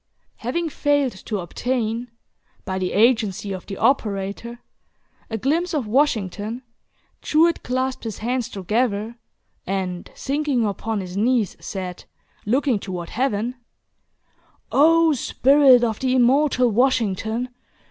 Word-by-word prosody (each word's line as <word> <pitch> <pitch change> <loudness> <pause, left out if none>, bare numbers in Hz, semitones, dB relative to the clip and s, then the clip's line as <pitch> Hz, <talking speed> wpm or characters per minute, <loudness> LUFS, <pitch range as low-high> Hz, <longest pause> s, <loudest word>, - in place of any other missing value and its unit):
Having 320 +8 -2
failed 285 -2 +1
to 210 +2 -5
obtain, 230 +5 -2 0.6
by 190 -1 -2
the 185 -1 -1
agency 215 -3 +2
of 185 -2 -8
the 195 - -6
operator, 220 -2 0 0.7
a 225 - -2
glimpse 325 - 0
of 280 -6 -1
Washington, 220 -2 0 0.6
Jewett 330 +2 +3
clasped 255 0 -2
his 220 -3 -4
hands 245 +1 -2
together, 215 +3 -1 0.5
and 185 -2 -3
sinking 280 -4 0
upon 210 +1 -2
his 180 -1 -7
knees, 225 0 +1
said, 185 -2 -6 0.4
looking 255 -1 +2
toward 180 -3 -6
Heaven: 245 0 -1 1.1
"O 325 +2 +5
spirit 270 -1 +5
of 225 -3 0
the 260 -1 +1
immortal 255 0 +3
Washington! 230 0 +1
235 Hz, 115 wpm, -22 LUFS, 205-265 Hz, 1.1 s, O